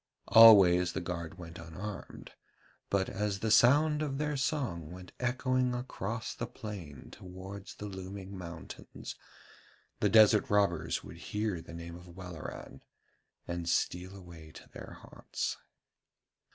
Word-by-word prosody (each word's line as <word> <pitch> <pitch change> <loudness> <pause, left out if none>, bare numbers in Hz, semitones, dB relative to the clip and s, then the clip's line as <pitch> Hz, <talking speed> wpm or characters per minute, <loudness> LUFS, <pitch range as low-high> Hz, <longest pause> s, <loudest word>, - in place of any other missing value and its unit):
Always 95 -6 +8
the - - -2
guard 85 0 -5
went 85 -2 -9
unarmed, 90 +5 -8 0.6
but 95 -1 +1
as 100 -1 -2
the 110 - 0
sound 150 +7 +5
of 140 -3 -2
their 150 0 -1
song 130 - -2
went 90 0 -10
echoing 130 0 +1
across 115 -3 -4
the 115 - -5
plain 100 - -8
towards 95 +2 -9
the 105 - -7
looming 95 0 -7
mountains, 85 -3 -8 0.8
the - - +2
desert 110 -1 +6
robbers 85 -6 +1
would 80 - -10
hear 105 +1 -3
the 85 - -11
name 85 0 -8
of 90 -1 -13
Welleran 90 -4 -8 0.7
and 85 -1 -3
steal 90 +2 -1
away 85 -4 -12
to - - -13
their - - -10
haunts. - - -4
95 Hz, 130 wpm, -31 LUFS, 85-110 Hz, 0.8 s, Always